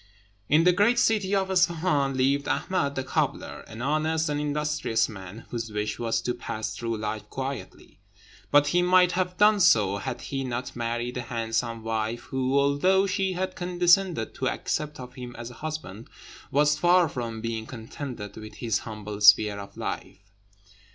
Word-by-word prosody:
In 155 +2 +5
the 180 - +6
great 210 +6 +3
city 210 -5 +2
of 190 -1 0
Isfahan 165 -6 +2
lived 140 +2 +2
Ahmed 145 -7 0
the 130 - -2
cobbler, - - -2
an 110 +2 -7
honest 155 +2 0
and 145 0 -1
industrious 150 -6 0
man, 100 +1 -10
whose 115 -2 -4
wish 105 +1 -3
was 115 -1 0
to 125 - -1
pass 110 -3 -5
through 115 -1 -3
life 105 0 -4
quietly; 135 -6 -6 0.5
and 145 0 +6
he 175 +5 +2
might 180 0 +5
have 180 0 -1
done 210 0 +5
so, 105 - +4
had 125 +4 -5
he 135 -1 -4
not 125 -1 -4
married 120 +1 -3
a - - -2
handsome 115 -1 -2
wife, 115 +1 -2
who, 130 +1 -1
although 145 +8 +3
she 190 0 0
had 185 +1 -3
condescended 175 - +2
to - - -1
accept 150 -1 -3
of 125 -1 -9
him 125 -2 -8
as 120 +1 -7
a 125 - -15
husband, 155 -9 -6 0.4
was 150 +1 +3
far 175 +1 +5
from 115 -5 -5
being 110 -1 -4
contented 115 -2 -7
with 110 0 -9
his 115 -4 -1
humble 105 -2 -7
sphere 105 0 +6
of 100 - -10
life. - - -5
130 Hz, 170 wpm, -26 LUFS, 115-170 Hz, 0.5 s, the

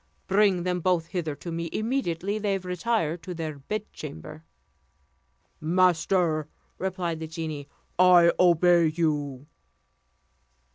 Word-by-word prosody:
Bring 195 -2 +3
them 180 0 -1
both 175 -1 +1
hither 170 -4 -3
to 170 - -8
me 165 0 -3
immediately 215 -4 -1
they 200 -2 0
retire 180 -2 -1
to 175 +2 -8
their 155 -3 -5
bedchamber." 135 - -7 1.2
"Master," 170 -1 +2 0.3
replied 180 -3 -2
the 160 - -5
genie, 155 -3 -6 0.3
"I 180 -2 +7
obey 175 -1 +5
you." 150 -4 -1
170 Hz, 105 wpm, -26 LUFS, 160-185 Hz, 1.2 s, I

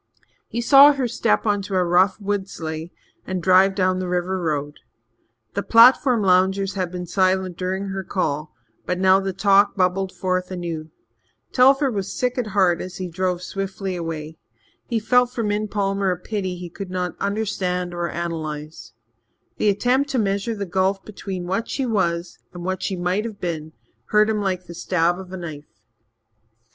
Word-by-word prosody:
He 235 - -3
saw 280 +4 +8
her 270 -3 -1
step 230 -1 +1
on 205 -2 +1
a 185 -2 +1
rough 185 +3 +3
wood 200 -1 -2
sleigh 160 0 -6 0.4
and 185 0 -2
drive 190 +2 +4
down 185 -1 +1
the 185 - -3
river 180 +1 -1
road. 150 -3 -2 0.7
The - - -1
platform 240 0 +5
loungers 190 +1 +2
had 185 -3 -2
been 180 -1 -5
silent 185 0 +1
during 190 +2 -3
her 195 0 -4
call, 155 -5 -2 0.4
but 180 - 0
now 190 +1 +5
the 195 0 -2
talk 200 +1 +3
bubbled 185 0 +1
forth 185 -1 -2
anew. 170 -4 -5 0.6
Telford 270 +2 +4
was 195 -1 -3
sick 250 +4 -1
at 240 - -1
heart 190 -4 +2
as 185 0 -7
he 185 - -4
drove 180 +1 -2
swiftly 195 0 -4
away. 160 -2 -5 0.5
He 230 - 0
felt 250 +3 +3
for 240 -2 -3
Min 210 0 -1
Palmer 195 -1 0
a 180 - 0
pity 190 -1 -4
he 175 -1 -8
could 195 +1 -7
not 180 -2 -3
understand 185 -4 -2
or 175 0 -2
analyze. 155 -4 -5 0.6
The 210 - +2
attempt 250 +7 +1
to 270 - -1
measure 200 +1 0
the 200 -1 -4
gulf 190 +1 0
between 195 -3 -6
what 195 +5 -2
she 270 - -1
was 170 -6 -1 0.2
and 175 0 -7
what 190 0 -2
she 195 - -2
might 180 +3 -1
have 220 -3 -7
been 160 -3 -4 0.3
hurt 215 +1 +3
him 210 -1 -1
like 185 -2 -2
the 170 - -9
stab 175 0 0
of 185 -1 -10
a 190 - -5
knife. 155 -4 -9
190 Hz, 175 wpm, -22 LUFS, 175-205 Hz, 0.7 s, saw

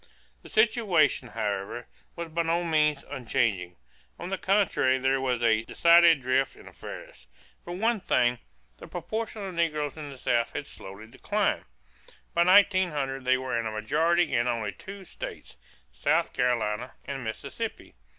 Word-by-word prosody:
The - - -13
situation, 200 - +2
however, 105 +1 -3 0.3
was 170 -1 -5
by 170 +2 -1
no 170 +1 0
means 150 -3 +1
unchanging. 115 -9 -1 0.4
On 180 - -7
the 195 - -1
contrary 190 -10 +2
there 135 +1 +1
was 125 -2 -1
a 110 -1 +4
decided 170 +3 +5
drift 130 +1 +1
in - - -15
affairs. 65 - -10 0.4
For 175 - -7
one 225 +4 +1
thing, 125 -8 +1 0.4
the - - -11
proportion 215 +5 -5
of 190 - -6
negroes 155 -3 -1
in 150 -2 -7
the 135 - -10
South 120 -2 0
had 145 - -4
slowly 100 -3 -10
declined. 110 - -1 0.7
By 170 - +4
1900 175 -9 +3
they 130 0 +4
were 130 -2 -2
in 115 - -2
a - - -3
majority 160 +11 +1
in 120 +1 +2
only 115 -4 -1
two 195 - -10
states, - - -8 0.4
South - - +1
Carolina 120 -1 0
and 135 -2 -5
Mississippi. 110 -1 -6
135 Hz, 150 wpm, -27 LUFS, 120-170 Hz, 0.7 s, decided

